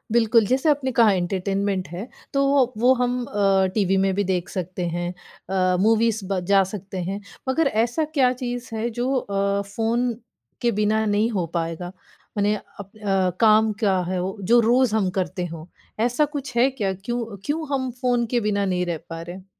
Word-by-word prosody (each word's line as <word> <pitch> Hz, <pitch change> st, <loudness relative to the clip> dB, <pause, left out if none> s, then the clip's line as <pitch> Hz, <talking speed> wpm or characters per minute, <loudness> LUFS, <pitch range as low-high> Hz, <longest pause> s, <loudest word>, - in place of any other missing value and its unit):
बिल्कुल, 225 Hz, -1 st, +4 dB
जैसे 265 Hz, +4 st, +2 dB
आपने 270 Hz, -3 st, +1 dB
कहा 230 Hz, -3 st, +5 dB
एंटरटेनमेंट 195 Hz, +1 st, -1 dB
है, 180 Hz, +8 st, -6 dB, 0.3 s
तो 275 Hz, 0 st, +2 dB
वो 265 Hz, -3 st, +3 dB
वो 250 Hz, +3 st, +5 dB
हम 250 Hz, 0 st, 0 dB
अ, 195 Hz, -2 st, +2 dB
टीवी 195 Hz, -3 st, +2 dB
में 195 Hz, 0 st, +2 dB
भी 205 Hz, -, +1 dB
देख 180 Hz, -2 st, -1 dB
सकते 180 Hz, -2 st, -4 dB
हैं, 175 Hz, +1 st, -2 dB, 0.4 s
अ, 185 Hz, -1 st, +2 dB
मूवीज़ 225 Hz, 0 st, +2 dB
ब 195 Hz, -2 st, 0 dB
जा 195 Hz, -1 st, +6 dB
सकते 190 Hz, 0 st, -7 dB
हैं। 200 Hz, +1 st, -3 dB, 0.3 s
मगर 305 Hz, +2 st, +2 dB
ऐसा 240 Hz, +7 st, +1 dB
क्या 250 Hz, -2 st, +5 dB
चीज़ 245 Hz, 0 st, -5 dB
है 230 Hz, +2 st, -1 dB
जो 245 Hz, +4 st, -1 dB
अ, 200 Hz, -2 st, 0 dB
फ़ोन 230 Hz, +4 st, -1 dB, 0.5 s
के 240 Hz, -1 st, +2 dB
बिना 215 Hz, +1 st, +1 dB
नहीं 210 Hz, +2 st, +2 dB
हो 185 Hz, -5 st, -1 dB
पाएगा? 170 Hz, +1 st, -3 dB, 0.5 s
मने 205 Hz, +1 st, +2 dB
अप 200 Hz, -1 st, -11 dB
अ, 195 Hz, -3 st, +1 dB
काम 220 Hz, 0 st, +5 dB
क्या 195 Hz, -4 st, +2 dB
है 185 Hz, -1 st, -1 dB
वो, 190 Hz, +3 st, -4 dB
जो 235 Hz, +6 st, +4 dB
रोज़ 240 Hz, 0 st, +3 dB
हम 195 Hz, -4 st, +2 dB
करते 180 Hz, 0 st, -2 dB
हो, 165 Hz, 0 st, -8 dB, 0.3 s
ऐसा 245 Hz, +6 st, +2 dB
कुछ 265 Hz, -3 st, -7 dB
है 255 Hz, +3 st, +5 dB
क्या? 200 Hz, -7 st, -2 dB
क्यों 225 Hz, +1 st, -4 dB
क्यों 310 Hz, +1 st, -2 dB
हम 260 Hz, -2 st, -1 dB
फ़ोन 245 Hz, -2 st, +2 dB
के 240 Hz, -, +3 dB
बिना 200 Hz, -1 st, +1 dB
नहीं 180 Hz, -1 st, 0 dB
रह 170 Hz, -2 st, -2 dB
पा 165 Hz, 0 st, -6 dB
रहे 175 Hz, +2 st, -7 dB
हैं? 190 Hz, 0 st, -12 dB
210 Hz, 195 wpm, -23 LUFS, 190-240 Hz, 0.5 s, जा